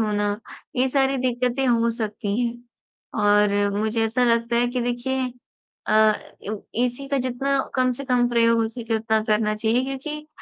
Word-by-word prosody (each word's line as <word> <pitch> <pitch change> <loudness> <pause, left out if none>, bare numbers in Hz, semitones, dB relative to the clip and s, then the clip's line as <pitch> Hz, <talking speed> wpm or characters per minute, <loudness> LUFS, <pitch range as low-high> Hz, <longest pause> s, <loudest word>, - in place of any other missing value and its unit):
होना, 205 -1 0 0.4
ये 255 +1 +3
सारी 270 0 +2
दिक़्क़तें 250 +1 0
हो 235 -1 +3
सकती 215 -2 -3
हैं। 240 0 -2 0.6
और 205 0 +4 0.3
मुझे 220 +1 0
ऐसा 240 +3 +1
लगता 235 0 +2
है 240 - +3
कि 250 +1 -2
देखिए 250 +1 -2 0.5
अ, 215 0 +5 0.7
एसी 250 +3 -3
का 280 0 +1
जितना 260 +2 0 0.2
कम 255 -1 +2
से 275 +3 -7
कम 245 -2 +2
प्रयोग 230 -1 +3
हो 225 - +2
सके 230 0 -4
उतना 220 0 +1
करना 215 0 +1
चाहिए 225 +3 +1
क्योंकि 300 +3 -5
240 Hz, 160 wpm, -23 LUFS, 220-255 Hz, 0.7 s, अ